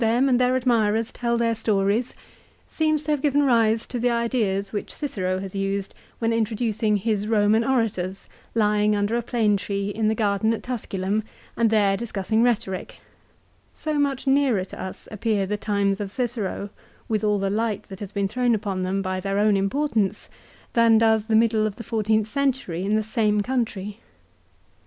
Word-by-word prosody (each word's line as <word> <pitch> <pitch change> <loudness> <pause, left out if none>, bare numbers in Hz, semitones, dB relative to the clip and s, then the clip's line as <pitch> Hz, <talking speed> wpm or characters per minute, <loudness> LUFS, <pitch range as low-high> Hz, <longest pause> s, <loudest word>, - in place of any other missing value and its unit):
313 235 +3 +3
them - - +2
and 250 -1 +3
their 250 +1 +3
admirers 230 -3 +1
tell 235 -1 -1
their 230 -1 +1
stories, 215 +1 0 0.5
seems 310 -1 0
to 300 - -2
have 295 -2 0
given 290 -1 +2
rise 230 -4 +3
to 245 - -5
the 245 +1 +2
ideas 225 -5 0
which 205 - -4
Cicero 185 -11 -2
has 190 0 -6
used 195 0 -2 0.2
when 230 -1 0
introducing 220 -1 0
his 210 0 -1
Roman 215 0 +3
orators, 215 -7 -1 0.3
lying 210 -1 +3
under 205 +2 0
a 240 - +1
plane 220 -3 +1
tree 200 0 -3
in 215 +1 -1
the 220 - +2
garden 215 +1 +1
at - - -9
Tusculum 210 -4 -2 0.3
and 230 -1 +2
there 205 -3 +3
discussing 220 0 -1
rhetoric; 225 -6 -1 0.8
so 305 -2 -2
much 280 -2 0
nearer 270 -8 +2
to - - -9
us 190 - -7
appear 210 -2 0
the 210 +2 -2
times 200 -1 0
of 200 -2 -4
Cicero, 220 -4 -3 0.4
with 220 -1 -1
all 210 -1 +2
the 195 0 -1
light 215 -1 -1
that 190 -1 -11
has 205 -2 -7
been 200 -1 0
thrown 245 +3 +1
upon 200 -3 -3
them 190 +2 -1
by 185 0 -2
their 195 +1 -2
own 210 0 +3
importance, 210 +1 0 0.4
than 230 -1 +5
does 220 -1 +3
the 220 - +2
middle 220 -1 +3
of 205 - -5
the 230 - -8
fourteenth 220 -1 0
century 260 - -1
in 205 +2 +1
the 215 - +1
same 215 -1 +1
country. 210 -4 -3
215 Hz, 180 wpm, -24 LUFS, 200-235 Hz, 0.8 s, than